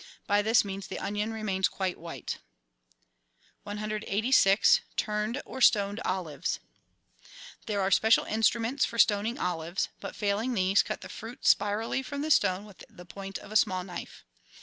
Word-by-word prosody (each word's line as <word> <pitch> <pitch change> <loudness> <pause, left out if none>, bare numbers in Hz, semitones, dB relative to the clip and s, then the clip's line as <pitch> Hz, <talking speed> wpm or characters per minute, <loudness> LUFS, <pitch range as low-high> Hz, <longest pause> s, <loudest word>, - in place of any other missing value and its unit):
By 205 0 +3
this 220 +1 +3
means 195 -1 -6
the - - -6
onion 210 +2 -2
remains 200 -4 0
quite 190 -2 -3
white. 165 0 -6 1.3
i86— 210 0 +3 0.2
TURNED 215 +5 -2
OR 260 - -8
STONED 205 -3 +4
OLIVES 175 -6 -2 1.1
There 205 -2 0
are 190 0 0
special 220 +3 +4
instruments 230 +4 +1
for 230 - -2
stoning 220 +2 +3
olives, 175 - -2
but, - - -7
failing 215 +4 -1
these, 190 0 +4
cut - - -5
the - - -8
fruit 230 +3 -9
spirally 210 +5 +2
from 285 +2 -5
the 310 - -1
stone 190 -7 +3
with 205 -3 -14
the 180 - -13
point 195 +2 -7
of - - -13
a - - -7
small 185 -3 +3
knife. 180 -1 -9
205 Hz, 150 wpm, -29 LUFS, 190-225 Hz, 1.3 s, STONED